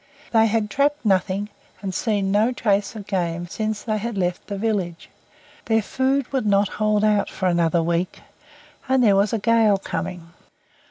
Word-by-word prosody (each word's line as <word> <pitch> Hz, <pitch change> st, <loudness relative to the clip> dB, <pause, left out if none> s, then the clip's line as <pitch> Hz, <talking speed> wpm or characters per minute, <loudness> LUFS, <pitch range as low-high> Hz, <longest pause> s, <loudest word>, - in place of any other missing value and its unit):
They 225 Hz, -1 st, +4 dB
had 215 Hz, -1 st, 0 dB
trapped 285 Hz, +2 st, +1 dB
nothing, 195 Hz, +1 st, +1 dB, 0.3 s
and 190 Hz, -1 st, -3 dB
seen 200 Hz, -2 st, 0 dB
no 215 Hz, +4 st, +3 dB
trace 205 Hz, -3 st, 0 dB
of 210 Hz, -2 st, -7 dB
game 175 Hz, -4 st, -2 dB
since 215 Hz, +3 st, -3 dB
they 215 Hz, -2 st, -1 dB
had 230 Hz, 0 st, -4 dB
left 180 Hz, -1 st, -2 dB
the 200 Hz, -, -4 dB
village; 195 Hz, -6 st, -2 dB, 0.5 s
their 225 Hz, -1 st, +2 dB
food 265 Hz, +3 st, 0 dB
would 260 Hz, -5 st, 0 dB
not 200 Hz, -1 st, +3 dB
hold 215 Hz, -1 st, +2 dB
out 210 Hz, -2 st, +2 dB
for 190 Hz, -, -4 dB
another 170 Hz, -2 st, +2 dB
week, 170 Hz, +2 st, -1 dB, 0.7 s
and 260 Hz, -1 st, +3 dB
there 205 Hz, -4 st, +5 dB
was 200 Hz, +1 st, +2 dB
a 230 Hz, -, 0 dB
gale 220 Hz, -1 st, +3 dB
coming. 175 Hz, -3 st, -5 dB
205 Hz, 170 wpm, -22 LUFS, 190-225 Hz, 0.7 s, there